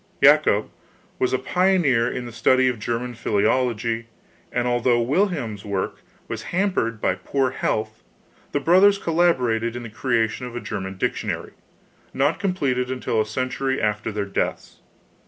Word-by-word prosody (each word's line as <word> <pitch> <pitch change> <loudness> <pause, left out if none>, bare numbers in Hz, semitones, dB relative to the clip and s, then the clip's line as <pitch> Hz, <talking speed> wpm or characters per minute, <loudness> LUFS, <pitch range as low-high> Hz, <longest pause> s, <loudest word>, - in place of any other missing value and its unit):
Jacob 145 -8 +5 0.5
was 130 - +1
a 130 - +2
pioneer 145 -5 +2
in 125 - -4
the 120 - -7
study 130 +3 +3
of 125 -3 -1
German 120 +3 -3
philology, 115 +1 0 0.4
and 125 0 0
although 120 0 +2
Wilhelm's 135 - 0
work 100 -2 -3 0.3
was - - -4
hampered 175 - -1
by - - +1
poor 130 +8 -1
health 110 0 -2 0.5
the 145 - 0
brothers 190 +6 +5
collaborated 125 -11 +1
in 120 - -5
the 115 - -7
creation 120 +1 0
of 120 - -9
a - - -2
German 95 -5 -5
dictionary, - - -2 0.6
not 145 +5 +1
completed 140 -11 0
until 125 -3 0
a 110 - -2
century 130 +3 -1
after 105 +1 -1
their 105 -1 -2
deaths. 100 - -3
125 Hz, 145 wpm, -23 LUFS, 110-140 Hz, 0.6 s, Jacob